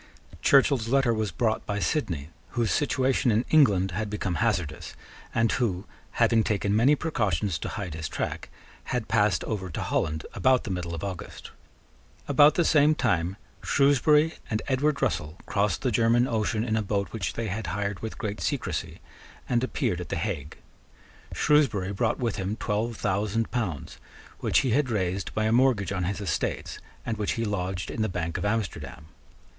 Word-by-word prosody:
Churchill's 135 Hz, -4 st, +4 dB
letter 135 Hz, -1 st, +3 dB
was 110 Hz, -2 st, -1 dB
brought 110 Hz, +6 st, 0 dB
by 105 Hz, -, -1 dB
Sidney, 85 Hz, -, -1 dB, 0.3 s
whose 115 Hz, -2 st, +2 dB
situation 135 Hz, -3 st, +1 dB
in 115 Hz, +2 st, +2 dB
England 100 Hz, -, +4 dB
had 105 Hz, +4 st, -3 dB
become 100 Hz, -3 st, -2 dB
hazardous, 95 Hz, -10 st, -1 dB, 0.4 s
and 115 Hz, -1 st, +2 dB
who, 100 Hz, -6 st, -1 dB, 0.3 s
having 115 Hz, -1 st, +3 dB
taken 100 Hz, -1 st, 0 dB
many 130 Hz, +7 st, +5 dB
precautions 105 Hz, -, -1 dB
to -, -, -4 dB
hide 95 Hz, -5 st, -5 dB
his 80 Hz, -1 st, -4 dB
track, -, -, -4 dB, 0.4 s
had 125 Hz, -3 st, -2 dB
passed 105 Hz, -2 st, +2 dB
over 95 Hz, -4 st, -3 dB
to 80 Hz, -, -5 dB
Holland 80 Hz, 0 st, -1 dB
about 130 Hz, -1 st, +3 dB
the 105 Hz, -, -4 dB
middle 90 Hz, -2 st, -3 dB
of 85 Hz, -, -7 dB
August. 95 Hz, -3 st, -7 dB, 0.8 s
About 145 Hz, +2 st, +6 dB
the 170 Hz, -, +2 dB
same 150 Hz, 0 st, +5 dB
time 90 Hz, -, 0 dB, 0.2 s
Shrewsbury 150 Hz, +3 st, +3 dB, 0.2 s
and 110 Hz, -1 st, -1 dB
Edward 140 Hz, +2 st, +1 dB
Russell 80 Hz, -, -1 dB
crossed 100 Hz, 0 st, 0 dB
the 130 Hz, -, +1 dB
German 115 Hz, +2 st, +3 dB
Ocean 110 Hz, -1 st, 0 dB
in 110 Hz, -2 st, 0 dB
a 110 Hz, -, +1 dB
boat 100 Hz, -1 st, -1 dB
which 100 Hz, -7 st, -3 dB
they 115 Hz, -, -3 dB
had 100 Hz, 0 st, -3 dB
hired 100 Hz, +2 st, -2 dB
with 110 Hz, -, -6 dB
great 105 Hz, -1 st, -4 dB
secrecy, -, -, -3 dB, 0.5 s
and 120 Hz, 0 st, +1 dB
appeared 90 Hz, -8 st, -1 dB
at 90 Hz, -, -7 dB
the -, -, -2 dB
Hague. 80 Hz, -9 st, -4 dB, 0.7 s
Shrewsbury 110 Hz, -11 st, +2 dB
brought 110 Hz, +3 st, 0 dB
with 120 Hz, -4 st, -2 dB
him 95 Hz, +2 st, -2 dB
twelve 110 Hz, +1 st, -2 dB
thousand 105 Hz, +3 st, -1 dB
pounds, 95 Hz, -, -3 dB, 0.4 s
which -, -, +2 dB
he 130 Hz, -, 0 dB
had 135 Hz, +2 st, +2 dB
raised 95 Hz, -3 st, -1 dB
by 110 Hz, -, +1 dB
a 110 Hz, -, +2 dB
mortgage 115 Hz, -6 st, +3 dB
on 90 Hz, -3 st, -1 dB
his 100 Hz, +3 st, -2 dB
estates, 100 Hz, -6 st, -2 dB, 0.3 s
and 115 Hz, -2 st, -2 dB
which 105 Hz, -1 st, -1 dB
he 115 Hz, -, -2 dB
lodged 95 Hz, -3 st, -3 dB
in -, -, -3 dB
the 110 Hz, -, +1 dB
bank 85 Hz, -2 st, -3 dB
of -, -, -3 dB
Amsterdam. 90 Hz, -10 st, -3 dB
105 Hz, 175 wpm, -27 LUFS, 95-120 Hz, 0.8 s, About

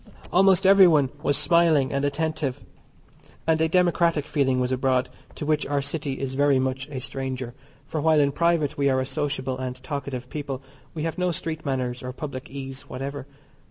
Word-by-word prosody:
Almost 190 Hz, 0 st, +5 dB
everyone 175 Hz, -9 st, +6 dB
was 145 Hz, -2 st, +1 dB
smiling 155 Hz, -3 st, +3 dB
and 140 Hz, 0 st, 0 dB
attentive, 145 Hz, -2 st, -1 dB, 0.9 s
and 160 Hz, -1 st, +2 dB
a 160 Hz, -, +2 dB
democratic 170 Hz, -3 st, +2 dB
feeling 130 Hz, -3 st, +1 dB
was 125 Hz, 0 st, 0 dB
abroad, 130 Hz, 0 st, +1 dB, 0.3 s
to -, -, -5 dB
which 155 Hz, 0 st, +1 dB
our 145 Hz, 0 st, 0 dB
City 140 Hz, 0 st, -3 dB
is 135 Hz, 0 st, -4 dB
very 140 Hz, 0 st, +3 dB
much 130 Hz, +1 st, -1 dB
a 140 Hz, -, -6 dB
stranger; 130 Hz, -1 st, -5 dB, 0.3 s
for 155 Hz, +1 st, -3 dB
while 160 Hz, 0 st, +4 dB
in 140 Hz, -1 st, +3 dB
private 155 Hz, -2 st, +1 dB
we 140 Hz, 0 st, +3 dB
are 130 Hz, -1 st, +2 dB
a 130 Hz, -, -1 dB
sociable 135 Hz, -2 st, -2 dB
and 130 Hz, -1 st, -3 dB
talkative 135 Hz, -3 st, -4 dB
people 140 Hz, -1 st, -5 dB, 0.3 s
we 155 Hz, -, -3 dB
have 165 Hz, +2 st, -3 dB
no 180 Hz, 0 st, +2 dB
street 160 Hz, -1 st, -4 dB
manners 125 Hz, -2 st, -2 dB
or 125 Hz, 0 st, -6 dB
public 135 Hz, 0 st, -6 dB
ease 135 Hz, -1 st, -7 dB
whatever. 140 Hz, +1 st, -5 dB
140 Hz, 180 wpm, -25 LUFS, 130-155 Hz, 0.9 s, everyone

